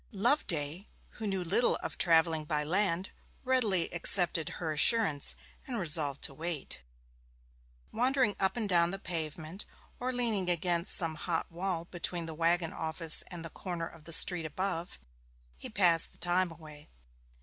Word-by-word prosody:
Loveday, 190 - -1 0.2
who 220 - -7
knew 190 -2 -2
little 195 +8 +1
of - - -6
travelling 165 -2 +2
by 150 0 -2
land, 185 +2 0 0.3
readily 225 -10 +1
accepted 175 -2 +2
her 160 -3 -4
assurance 155 - +4 0.3
and 250 -3 -4
resolved 150 -6 +4
to - - +2
wait. 160 0 -6 1.1
Wandering 250 -2 0
up 190 +4 -1
and 220 -3 -2
down 170 -3 +2
the 195 - -4
pavement, 165 0 -5 0.4
or 255 +1 -3
leaning 225 -7 0
against 175 0 +1
some 165 -3 +1
hot 165 +2 -4
wall 175 -1 -3
between 175 -1 -4
the 160 - -7
waggon 165 +1 0
office 160 0 +4
and 175 -3 -9
the 165 - -9
corner 175 -3 -6
of 165 -2 -17
the 165 - -8
street 165 0 +5
above, 175 +2 -5 0.6
he - - -7
passed 175 -4 +3
the - - -21
time 180 +1 0
away. 155 -2 -14
175 Hz, 150 wpm, -29 LUFS, 160-195 Hz, 1.1 s, street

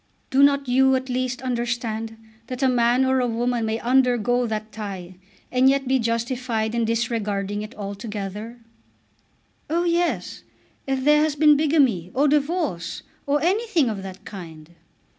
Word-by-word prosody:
"Do 270 - +4
not 280 -1 +4
you 265 +1 +4
at 260 0 -3
least 255 0 -2
understand 235 -3 -3 0.3
that 255 +2 -4
a - - +5
man 245 +1 +3
or 260 0 +2
a 250 - +1
woman 235 0 -1
may 220 +1 -1
undergo 245 -1 +2
that 215 0 -4
tie, 190 -4 -7 0.3
and 255 +1 +4
yet 275 -1 +1
be 265 0 +2
justified 230 -1 -1
in 235 -1 +1
disregarding 210 -3 -1
it 215 +4 -8
altogether?" 210 +2 -6 1.1
"Oh, 335 +3 +1
yes; 345 0 -1 0.5
if 265 -1 -1
there 300 +1 +5
has 305 -1 +1
been 300 0 +6
bigamy, 280 - +2
or 285 +3 +3
divorce, 290 - -1 0.2
or 285 +1 +1
anything 365 - +1
of 200 -2 -5
that 190 -1 -9
kind." 165 -5 -10
245 Hz, 150 wpm, -23 LUFS, 220-270 Hz, 1.1 s, been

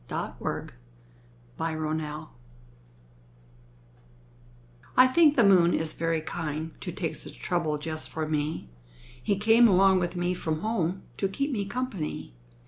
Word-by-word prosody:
II - - -2
The - - -3 0.9
Kind 160 -1 -2
Moon 155 -1 -3 2.7
I 255 - +9
think 295 +3 +5
the 240 - +5
moon 180 -4 +5
is 160 -1 -2
very 165 -1 -1
kind 160 0 -4
To - - -4
take - - -3
such - - -6
trouble 165 -4 -1
just 155 +1 -5
for 160 -1 -3
me. 150 - -2 0.5
He 165 +11 +1
came 225 +3 +6
along 190 -1 +5
with 175 0 -2
me 175 0 0
from 160 -3 -3
home 190 -4 -1
To 195 - +1
keep 280 +9 -2
me 205 -6 -1
company. 200 - -4
175 Hz, 135 wpm, -27 LUFS, 155-200 Hz, 2.7 s, I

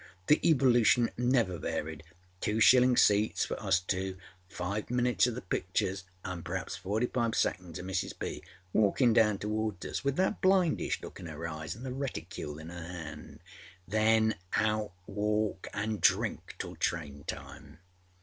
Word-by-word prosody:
The 150 - +5
evolution 125 -6 +4
never 120 -8 +1
varied. 80 0 -3 0.4
Two 105 +4 0
shilling 125 +2 +6
seats 105 +1 +4
for - - -5
us - - +3
two; 95 +1 -3 0.3
five 100 +4 -4
minutes 125 0 +3
oâ 120 - -2
the 125 - -6
pictures, 95 +1 -1 0.2
anâ 90 -3 -5
perhaps 90 0 -4
forty 105 +6 -1
five 120 -2 -1
seconds 90 -3 -1
oâ 90 - -7
Mrs. 95 -1 -2
B. - - -4 0.3
walking 110 +3 +4
down 110 -3 +4
towards 105 -1 -2
us - - -3
with 140 -1 0
that 190 +5 0
blindish 185 -3 +2
look - - -9
in 85 - -7
her 80 +1 -5
eyes 80 +1 -5
anâ 120 - -10
the 130 -1 -4
reticule 90 - -5
in 80 +1 -9
her 85 0 -7
hand. 85 -2 -8 0.5
Then 110 +2 +3 0.2
out 105 -1 +1 0.2
walkâand 105 0 -1
drink - - +1
till - - -6
train 75 -4 -2
time. 70 +1 -8
105 Hz, 155 wpm, -31 LUFS, 90-120 Hz, 0.5 s, shilling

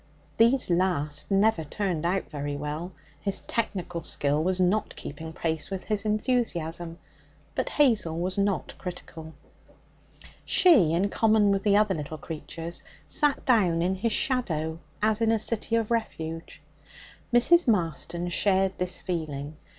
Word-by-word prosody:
These 235 -2 +3
last 160 -5 0
never 200 -2 +3
turned 170 0 -2
out 190 +2 -1
very 145 -1 -3
well, 150 +5 -4 0.3
his 195 +4 -2
technical 185 -6 -3
skill 145 0 0 0.2
not 185 +4 +1
keeping 160 +3 -7
pace 160 -1 -2
with 195 -1 -4
his 210 -1 -2
enthusiasm; 175 -8 -1 0.6
but - - -2
Hazel 220 - +2
was 185 +2 -1
not 200 -1 -1
critical. 165 -3 -8 1.1
She, 265 - +5
in 190 +4 +1
common 215 -2 +3
with 195 -1 +1
the 205 0 +3
other 210 -2 +3
little 155 -1 -5
creatures, 165 +2 -6 0.2
sat 295 -3 +1
down 185 -10 +3
in 185 +2 +1
his 215 +5 -1
shadow 165 - -1 0.2
as 215 +1 +2
in 225 0 +3
a 225 - +3
city 225 +1 0
of 230 -1 0
refuge. 165 -8 -4 0.7
Mrs. 285 +8 +5
Marston 175 - 0
shared 190 +1 +1
this 180 0 -2
feeling. 155 -4 -4
185 Hz, 135 wpm, -27 LUFS, 160-215 Hz, 1.1 s, She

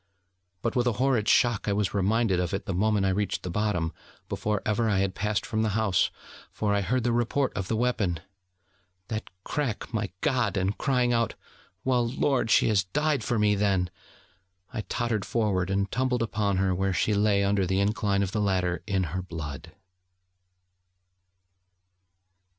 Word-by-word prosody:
But - - -1
with 125 -1 +2
a 120 - +2
horrid 120 -2 +1
shock 120 -5 +3
I 100 - +2
was 100 -1 0
reminded 100 0 +2
of 90 +1 -1
it 100 - -5
the 95 - -2
moment 105 +2 +2
I - - +3
reached 100 +1 -1
the 90 - -4
bottom, 85 -5 0 0.4
before 105 -1 -1
ever 110 +1 +1
I 100 - +2
had 95 0 +1
passed 105 +2 -1
from 110 - -1
the 110 -1 0
house: 105 -5 +2 0.4
for 105 -1 0
I 100 - +2
heard 120 +6 0
the 120 - +1
report 120 +3 +1
of 95 -2 -3
the 110 - 0
weapon 110 -8 0 0.9
that 110 0 -4
crack, 125 -5 -3
my 110 -3 -1
God! 125 -8 +1
and 95 +2 0
crying 125 -3 +1
out: 115 -2 +1 0.5
'Well, 125 -2 +2
Lord, 130 -2 +1
she - - +5
has 100 -3 +2
died 150 +5 0
for 120 - 0
me, 105 -1 +3
then!' 100 -3 +1 0.8
I 115 - -2
tottered 115 -4 -1
forward, 100 -6 0
and 100 0 0
tumbled 125 -1 +1
upon 105 -3 0
her, 95 -1 +2
where 95 +1 0
she 105 - +1
lay 100 -1 +3
under 100 -1 +1
the 95 +2 +1
incline 100 -1 +1
of 95 - -2
the 105 - -1
ladder 90 -3 0
in 95 -2 +1
her 90 - -1
blood. 80 -6 -7
105 Hz, 175 wpm, -27 LUFS, 95-115 Hz, 0.9 s, she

